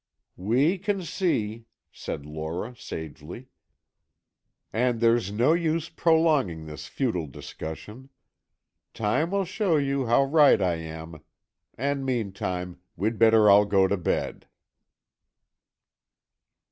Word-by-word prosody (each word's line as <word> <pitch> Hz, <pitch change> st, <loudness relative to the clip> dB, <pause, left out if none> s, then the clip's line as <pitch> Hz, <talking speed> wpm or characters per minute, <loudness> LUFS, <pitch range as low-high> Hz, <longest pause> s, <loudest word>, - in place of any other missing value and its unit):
"We 135 Hz, -, +2 dB
can 195 Hz, 0 st, -2 dB
see," 115 Hz, -, -2 dB, 0.3 s
said 70 Hz, -, -6 dB
Lora, 80 Hz, +10 st, -5 dB
sagely. 80 Hz, -, -8 dB, 1.2 s
"And 120 Hz, +1 st, +1 dB
there's 115 Hz, -3 st, +2 dB
no 120 Hz, +9 st, +3 dB
use 165 Hz, -1 st, 0 dB
prolonging 160 Hz, -, +2 dB
this 75 Hz, -1 st, -8 dB
futile 90 Hz, -, -2 dB
discussion. 95 Hz, -, -9 dB, 0.9 s
Time 115 Hz, +10 st, 0 dB
will 195 Hz, 0 st, 0 dB
show 185 Hz, -2 st, 0 dB
you 140 Hz, -2 st, 0 dB
how 120 Hz, +4 st, +4 dB
right 145 Hz, -3 st, +5 dB
I 90 Hz, -3 st, +1 dB
am, 80 Hz, 0 st, -8 dB, 0.6 s
and 140 Hz, +2 st, -1 dB
meantime, 95 Hz, -7 st, -3 dB, 0.2 s
we'd 110 Hz, +2 st, -2 dB
better 110 Hz, -1 st, +6 dB
all 100 Hz, +1 st, +7 dB
go 100 Hz, -2 st, +3 dB
to 100 Hz, -, +1 dB
bed." 90 Hz, -, -2 dB
115 Hz, 110 wpm, -26 LUFS, 90-140 Hz, 1.2 s, all